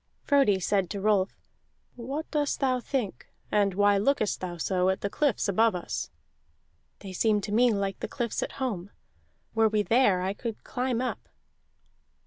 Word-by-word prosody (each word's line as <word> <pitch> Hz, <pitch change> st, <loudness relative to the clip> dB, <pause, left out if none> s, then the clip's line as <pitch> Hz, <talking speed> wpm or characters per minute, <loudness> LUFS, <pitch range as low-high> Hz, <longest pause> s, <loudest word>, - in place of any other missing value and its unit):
Frodi 275 Hz, -10 st, +3 dB
said 190 Hz, 0 st, 0 dB
to 200 Hz, -, -4 dB
Rolf: 200 Hz, -1 st, +1 dB, 0.6 s
"What 270 Hz, +6 st, -5 dB
dost 295 Hz, -2 st, 0 dB
thou 255 Hz, -2 st, +1 dB
think, 240 Hz, -, -3 dB, 0.2 s
and 200 Hz, -3 st, +2 dB
why 205 Hz, 0 st, +4 dB
look'st 215 Hz, -2 st, +1 dB
thou 175 Hz, -1 st, -5 dB
so 185 Hz, +2 st, +1 dB
at 190 Hz, -, -1 dB
the 200 Hz, -, -2 dB
cliffs 285 Hz, -8 st, +1 dB
above 220 Hz, +1 st, +3 dB
us?" 175 Hz, -, -4 dB, 0.9 s
"They 190 Hz, -2 st, -8 dB
seem 210 Hz, +2 st, +2 dB
to 205 Hz, -, -5 dB
me 240 Hz, +3 st, +4 dB
like 200 Hz, -2 st, -2 dB
the -, -, -3 dB
cliffs 240 Hz, -5 st, -3 dB
at -, -, -4 dB
home. 205 Hz, -9 st, -3 dB, 0.6 s
Were 225 Hz, -1 st, +3 dB
we 210 Hz, -1 st, +1 dB
there 210 Hz, -6 st, +3 dB
I 190 Hz, +1 st, -1 dB
could 225 Hz, +1 st, -6 dB
climb 250 Hz, -1 st, -1 dB
up." 255 Hz, -, -4 dB
210 Hz, 165 wpm, -28 LUFS, 195-250 Hz, 0.9 s, why